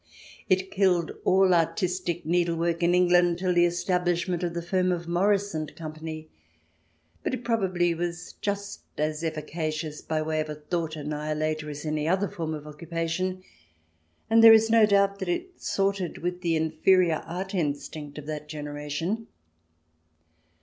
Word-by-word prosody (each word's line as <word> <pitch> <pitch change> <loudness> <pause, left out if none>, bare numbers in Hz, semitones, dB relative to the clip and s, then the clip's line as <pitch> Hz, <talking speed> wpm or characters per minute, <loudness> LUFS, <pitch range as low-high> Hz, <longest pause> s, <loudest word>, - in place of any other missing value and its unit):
It 185 0 +2
killed 180 -4 +2
all 190 0 +5
artistic 175 0 0
needlework 170 0 +1
in 175 +1 +3
England 175 -1 +4
till 180 0 0
the 175 0 +5
establishment 175 0 0
of 175 -1 -2
the 170 - -2
firm 185 +1 +1
of 170 -1 -3
Morris 200 +3 +1
and 155 -1 -4
Company. 155 0 -7 0.9
But - - -1
it 250 - -9
probably 185 -7 +1
was 175 +1 -4
just 200 0 -3 0.2
as 155 +1 -1
efficacious 155 -1 -3
by 155 -1 -1
way 155 0 -1
of 155 - -5
a 150 - -4
thought 160 +1 -3
annihilator 155 +1 -2
as 145 +1 -7
any 155 0 -1
other 190 +4 +2
form 160 -3 -4
of 150 -1 -9
occupation, 165 +4 -3 0.8
and 225 0 +5
there 225 0 +11
is 225 0 +5
no 225 -2 +6
doubt 200 -1 +3
that - - -3
it 355 +1 -3
sorted 195 -3 -1
with 180 +1 -3
the 170 -2 +1
inferior 160 +2 +3
art 185 +3 -5
instinct 150 -3 -3
of 150 - -7
that 150 0 -6
generation. 150 +8 -4
170 Hz, 150 wpm, -27 LUFS, 155-185 Hz, 0.9 s, there